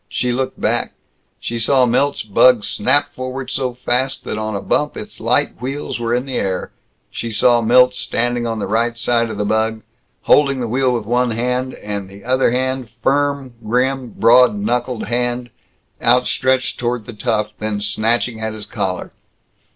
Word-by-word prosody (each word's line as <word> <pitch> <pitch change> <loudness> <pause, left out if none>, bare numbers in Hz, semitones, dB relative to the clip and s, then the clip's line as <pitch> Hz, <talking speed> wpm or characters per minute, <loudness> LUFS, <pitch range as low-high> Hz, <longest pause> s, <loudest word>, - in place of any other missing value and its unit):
She 125 - -1
looked 130 +1 -3
back. - - 0 0.4
She 120 0 -4
saw 130 +3 +4
Milt's 140 +4 +1
bug 110 +2 +4
snap 145 +8 +1
forward 130 0 -5
so 130 -2 -2
fast 125 +2 -1
that - - -4
on 110 -1 -3
a - - -1
bump - - -1
its - - -9
light - - 0
wheels 135 0 -4
were 115 0 -2
in 125 +2 0
the 135 -2 -3
air. 95 -2 -2 0.4
She 115 - -4
saw 120 +2 +3
Milt 125 +2 +5
standing 120 -1 -1
on 115 -1 -2
the 105 - -2
right 115 +2 0
side 115 0 +1
of 110 - -5
the 105 - -1
bug 110 +1 0 0.4
holding 140 -2 +4
the 120 - -2
wheel 130 +3 +1
with 120 -3 -2
one 125 +2 +1
hand, 125 +3 -2
and 100 -2 -5
the 100 +1 -13
other 130 +1 +2
hand 130 0 -1
firm, 140 +2 -1
grim, 125 +1 -1
broad 120 0 +6
knuckled 120 +3 -2
hand 120 +1 -2 0.5
outstretched 125 +2 +2
toward 120 -2 -2
the 120 - -8
tough, 105 0 -1
then 105 -1 -2
snatching 110 +3 0
at 110 0 -3
his 110 -1 -7
collar. 90 -1 -3
120 Hz, 175 wpm, -18 LUFS, 110-130 Hz, 0.5 s, broad